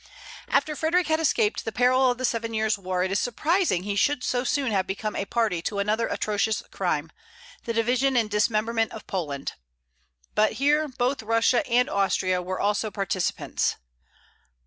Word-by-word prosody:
After 295 +2 +1
Frederic 335 +4 +1
had 315 0 +2
escaped 250 -9 +1
the 225 - -3
perils 255 +2 +3
of - - -18
the 255 - -1
Seven 230 -1 -2
Years' 220 0 +1
War, 185 -2 -2
it 190 - -2
is 195 - +1
surprising 300 - +1
he 200 0 -2
should 285 +5 +1
so 245 -1 0
soon 270 -2 0
have 190 -2 0
become 210 +2 -3
a 195 - -2
party 215 -6 0
to 200 +4 -3
another 210 +3 +1
atrocious 215 +1 -1
crime, - - -2 0.5
the 230 - -2
division 250 +3 +2
and 225 -2 +2
dismemberment 215 +1 +1
of 220 - -9
Poland. 145 -7 -4 0.8
But 215 0 +3
here 295 +3 +2
both 255 0 -1
Russia 230 +2 +2
and 250 +1 +3
Austria 185 -2 +1
were 185 +1 -4
also 210 +2 0
participants. 195 -2 -1
225 Hz, 170 wpm, -25 LUFS, 200-255 Hz, 0.8 s, perils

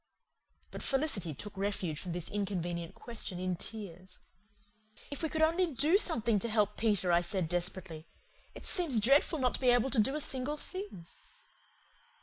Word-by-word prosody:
But - - -6
Felicity 245 - -1
took 205 +8 -7
refuge 195 -6 -2
from 180 - -5
this 175 -1 -4
inconvenient 175 -4 -3
question 220 -6 -5
in 185 0 -1
tears. 185 -2 -8 0.9
"If 285 - -4
we 320 - 0
could 315 +1 +1
only 340 +3 +3
DO 315 - +4
something 235 - +2
to 235 - -2
help 210 -1 +2
Peter!" 205 -5 +2
I 170 0 +5
said 175 0 -1
desperately. 175 -1 -1 0.5
"It - - -9
seems 320 - +2
dreadful 275 - +4
not 255 -3 +1
to - - -4
be 255 - +4
able 245 +2 +3
to 255 - +2
do 270 +7 +3
a - - -1
single 280 +1 -2
thing." 370 - -7
210 Hz, 165 wpm, -32 LUFS, 180-275 Hz, 0.9 s, I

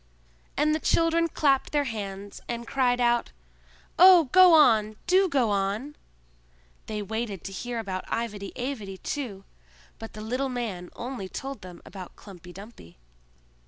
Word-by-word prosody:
And 305 +1 +3
the 310 - 0
children 330 +1 +2
clapped 280 -4 +1
their 290 -1 +2
hands, 200 -5 -6
arid 235 0 -4
cried 250 -1 +1
out, 240 -1 +1 0.7
"Oh, 355 -5 +8
go 370 -1 +8
on! 220 -8 +4
Do 375 +1 +3
go 255 -8 +1
on!" 205 +9 -2 0.9
they 210 -1 -4
waited 220 -2 -4
to 195 - -6
hear 240 +5 -5
about 190 -4 -4
Ivedy 210 -4 -3
Avedy 240 -7 -5
too, 215 -6 -5 0.6
but 225 0 -9
the 215 - -8
little 255 +5 -2
man 220 -8 -4
only 240 -6 -6
told 270 +5 -6
them 180 -1 -12
about 185 -3 -10
Klumpy 180 -3 -13
Dumpy. 195 - -13
235 Hz, 145 wpm, -26 LUFS, 200-275 Hz, 0.9 s, Oh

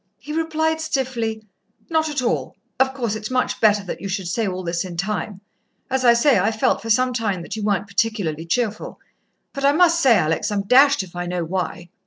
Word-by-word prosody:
He 300 - -8
replied 320 0 0
stiffly, 245 -8 -2 0.4
"Not 320 -1 +1
at 280 -4 -2
all. 240 - -1 0.2
Of 265 0 +3
course, 245 -5 -3
it's 215 0 -5
much 255 0 -1
better 210 -2 +4
that 185 - -6
you 200 - -4
should 190 -2 -3
say 215 +5 -1
all 185 0 -4
this 170 0 -2
in 180 -2 -8
time... 200 +1 -3 0.5
as 265 0 0
I 240 -1 +7
say, 235 -1 +4
I've 220 +4 0
felt - - +2
for 225 - -7
some 255 +3 +2
time 205 -7 -2
that 200 - -6
you 220 - -5
weren't 205 -1 0
particularly 200 -6 -2
cheerful. 220 +2 -2 0.5
But 275 - -5
I 280 +1 +5
must 335 +1 +4
say, 245 -7 +5
Alex, 160 +7 0
I'm 200 -1 -1
dashed 265 +2 +5
if 180 -2 -14
I 175 0 -4
know 175 -1 -2
why." 175 0 -4
220 Hz, 215 wpm, -21 LUFS, 190-265 Hz, 0.5 s, I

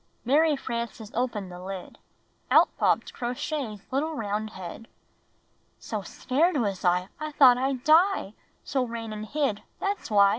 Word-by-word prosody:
Mary 300 +4 +4
Frances 235 -4 -5
opened 220 -6 -2
the 180 0 -9
lid. 190 -1 -7 0.5
Out - - +5
popped - - +2
Crow 245 -1 -3
Shay's 245 -9 -4
little 305 +4 0
round 215 -2 -2
head. 190 +3 -9 0.9
"So - - -4
scared 310 +6 0
was 200 -7 -1
I, 180 +1 +2
I 305 -1 -4
thought 255 -4 +7
I'd 265 -1 -1
die; 320 - +4 0.3
So 265 -2 0
ran 230 -2 -5
and 215 0 -6
hid 275 -8 0
— - - -41
That's 400 -6 -2
why! 200 -2 +6
240 Hz, 155 wpm, -27 LUFS, 210-285 Hz, 0.9 s, thought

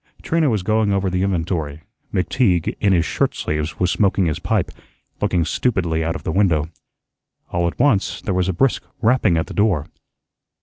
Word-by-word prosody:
Trina 160 -3 +2
was 105 -6 0
going 110 +1 +1
over 100 -1 0
the 90 0 0
inventory; 80 -5 -2 0.3
McTeague, 90 - +1
in 100 - +2
his 85 -3 +3
shirt - - 0
sleeves, 75 +1 -3
was 90 -1 +2
smoking 100 -2 +2
his 80 -3 -1
pipe, - - -1 0.5
looking 85 -2 +1
stupidly 85 -5 0
out 80 +1 -1
of - - -7
the - - -2
window. 80 -5 +1 0.8
All 85 0 +1
at 85 - -4
once 120 -7 +2
there 100 - -3
was 90 0 +1
a - - 0
brisk 130 +9 +1 0.2
rapping 115 -6 +3
at 80 - 0
the - - -9
door. 100 -8 +1
90 Hz, 180 wpm, -20 LUFS, 80-105 Hz, 0.8 s, his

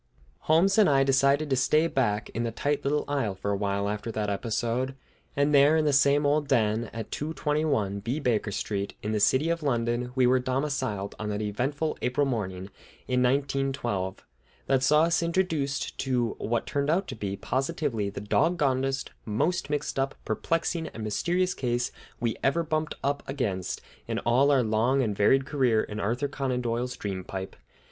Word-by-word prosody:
Holmes 190 +6 +4
and 210 - +6
I 135 -1 +4
decided 140 +2 +3
to - - +4
stay 150 +5 +3
back 115 -9 0
in 115 - -3
the 120 - -1
tight 140 +5 -1
little 145 +2 0
isle 135 -9 -1
for 100 +2 -3
a - - +1
while 100 0 -1
after 105 +2 -3
that 105 -1 -1
episode, 120 +5 -1 0.4
and 145 +1 +2
there 145 +3 +6
in 155 - +2
the 145 - +2
same 140 +1 +4
old 145 0 +2
den, 115 -4 +1
at 115 -1 -6
221 150 -9 -1
B 120 +9 -2
Baker 115 -6 0
Street, 100 0 -3
in 105 - -2
the 110 - 0
city 135 +10 +3
of 170 0 -1
London, 120 -3 0
we 130 -1 +4
were 130 +1 +4
domiciled 130 -6 -2
on 105 - -3
that 105 +1 -2
eventful 135 +9 -2
April 130 +3 +1
morning 100 -6 -3 0.4
in 125 -1 +1
1912 130 -7 -1 0.4
that 135 -1 +2
saw 150 +4 +5
us 165 0 +2
introduced 165 -5 -1
to 125 -3 +1
what 115 +1 -1
turned 140 0 -1
out 180 +4 +1
to - - -6
be 100 -1 -3
positively 130 -6 -1
the 100 - -6
dog 165 +12 +2
gonedest, 135 -2 0
most 135 +9 -1
mixed 150 -2 -2
up, 135 0 -1
perplexing, 165 +7 -1
and 110 - -7
mysterious 175 - 0
case 120 -1 -1 0.3
we 115 -2 -1
ever 165 +5 +2
bumped 155 -1 -2
up 140 +1 0
against 95 -9 -2 0.3
in - - -2
all 130 +4 +3
our 135 -3 +4
long 115 +5 +2
and 105 -4 -1
varied 130 +7 +3
career 130 -6 +2
in 105 0 -6
Arthur 120 +7 0
Conan 135 -3 -2
Doyle's 120 +1 -2
dream 95 -2 -4
pipe. 95 +1 -6
130 Hz, 180 wpm, -27 LUFS, 110-145 Hz, 0.4 s, and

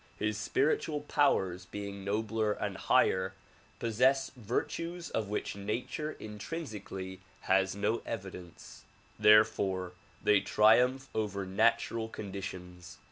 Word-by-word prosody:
His 110 0 -1
spiritual 145 +7 0
powers 95 -12 +1
being 100 +1 -6
nobler 110 +1 0
and - - -3
higher, 95 +1 +2 0.4
possess 125 +4 +2
virtues 165 - -3
of 110 -2 -1
which 105 -1 -3
nature 120 +9 -3
intrinsically 105 - -6 0.2
has 95 0 +2
no 105 +3 0
evidence; 90 -5 -8 0.4
therefore 100 -4 +4 0.3
they 105 - +5
triumph 125 +5 +4
over 100 -3 -2
natural 110 +4 +1
conditions. 90 -4 -7
105 Hz, 100 wpm, -31 LUFS, 95-115 Hz, 0.4 s, they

